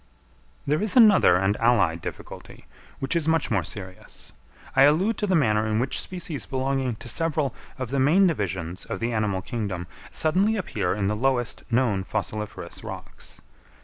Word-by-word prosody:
_ -, -, -33 dB, 0.6 s
There 150 Hz, +3 st, +1 dB
is 215 Hz, +5 st, +1 dB
another 210 Hz, -, +7 dB
and 95 Hz, +2 st, +1 dB
allied 100 Hz, -8 st, +2 dB
difficulty, -, -, -9 dB, 0.3 s
which 135 Hz, +3 st, -2 dB
is 165 Hz, -2 st, 0 dB
much 160 Hz, -4 st, +1 dB
more 100 Hz, -4 st, +2 dB
serious. 95 Hz, +1 st, -8 dB, 0.4 s
I 135 Hz, -, +5 dB
allude 165 Hz, +11 st, +4 dB
to 210 Hz, -, 0 dB
the 185 Hz, -, +2 dB
manner 110 Hz, -7 st, +2 dB
in 110 Hz, 0 st, 0 dB
which 130 Hz, +4 st, 0 dB
species 170 Hz, -5 st, -4 dB
belonging 130 Hz, -2 st, -1 dB
to 115 Hz, -, -11 dB
several 155 Hz, 0 st, 0 dB, 0.2 s
of 130 Hz, -2 st, -5 dB
the 140 Hz, -, 0 dB
main 160 Hz, +9 st, +5 dB
divisions 95 Hz, -, -2 dB
of 95 Hz, -, -5 dB
the 115 Hz, +1 st, -1 dB
animal 105 Hz, -4 st, -1 dB
kingdom 100 Hz, -7 st, -4 dB, 0.2 s
suddenly 190 Hz, +8 st, +2 dB
appear 105 Hz, -, -2 dB
in 100 Hz, -1 st, -1 dB
the 105 Hz, +2 st, 0 dB
lowest 125 Hz, +1 st, 0 dB
known 115 Hz, -6 st, +1 dB
fossiliferous 105 Hz, +1 st, -5 dB
rocks. -, -, -10 dB
120 Hz, 170 wpm, -25 LUFS, 105-155 Hz, 0.6 s, another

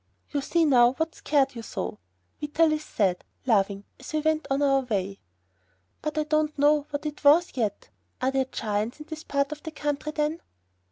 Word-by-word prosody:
"You 285 Hz, -, 0 dB
see 335 Hz, +4 st, +2 dB
now 245 Hz, -4 st, +5 dB
what 320 Hz, +3 st, -2 dB
scared 280 Hz, -2 st, +1 dB
you 235 Hz, -, -6 dB
so," 215 Hz, -, -5 dB, 0.4 s
Vitalis 310 Hz, +1 st, +2 dB
said, 190 Hz, -9 st, 0 dB, 0.2 s
laughing, 200 Hz, -4 st, +2 dB, 0.2 s
as 260 Hz, -, -9 dB
we 310 Hz, -, +1 dB
went 315 Hz, +1 st, +1 dB
on 275 Hz, +1 st, +1 dB
our 275 Hz, -1 st, +4 dB
way. 200 Hz, -6 st, -2 dB, 0.8 s
"But 305 Hz, 0 st, -3 dB
I 305 Hz, -, +3 dB
don't 305 Hz, 0 st, 0 dB
know 295 Hz, +1 st, +3 dB
what 285 Hz, +1 st, -4 dB
it 300 Hz, -1 st, -5 dB
is, 315 Hz, +5 st, +5 dB
yet. 215 Hz, -6 st, -2 dB, 0.3 s
Are 260 Hz, +1 st, +1 dB
there 270 Hz, -1 st, +1 dB
giants 215 Hz, 0 st, -2 dB
in 300 Hz, -, -8 dB
this 315 Hz, 0 st, -7 dB
part 280 Hz, +1 st, 0 dB
of 300 Hz, 0 st, -6 dB
the 320 Hz, -, -6 dB
country, 295 Hz, -1 st, -3 dB
then?" 305 Hz, +2 st, -1 dB
290 Hz, 185 wpm, -26 LUFS, 245-305 Hz, 0.8 s, now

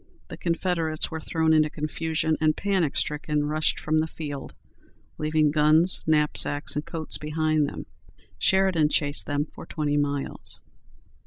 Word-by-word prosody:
The -, -, -8 dB
Confederates 165 Hz, -2 st, -1 dB
were 160 Hz, -, -4 dB
thrown 160 Hz, 0 st, +1 dB
into 155 Hz, -1 st, +4 dB
confusion, 160 Hz, +1 st, -1 dB
and, 155 Hz, -1 st, +2 dB
panic 190 Hz, -7 st, 0 dB
stricken, 150 Hz, 0 st, -1 dB
rushed 155 Hz, +1 st, 0 dB
from 155 Hz, 0 st, +1 dB
the 160 Hz, -, 0 dB
field, 145 Hz, -4 st, -7 dB, 0.6 s
leaving 155 Hz, -1 st, +2 dB
guns, 155 Hz, +4 st, +4 dB
knapsacks, 150 Hz, -1 st, +2 dB
and 150 Hz, -, -1 dB
coats 160 Hz, -1 st, +1 dB
behind 155 Hz, -1 st, 0 dB
them. -, -, -8 dB, 0.5 s
Sheridan 185 Hz, -, +3 dB
chased 145 Hz, -1 st, 0 dB
them 145 Hz, 0 st, 0 dB
for -, -, -12 dB
twenty 145 Hz, -2 st, -1 dB
miles. 145 Hz, -1 st, -3 dB
155 Hz, 140 wpm, -25 LUFS, 150-160 Hz, 0.6 s, into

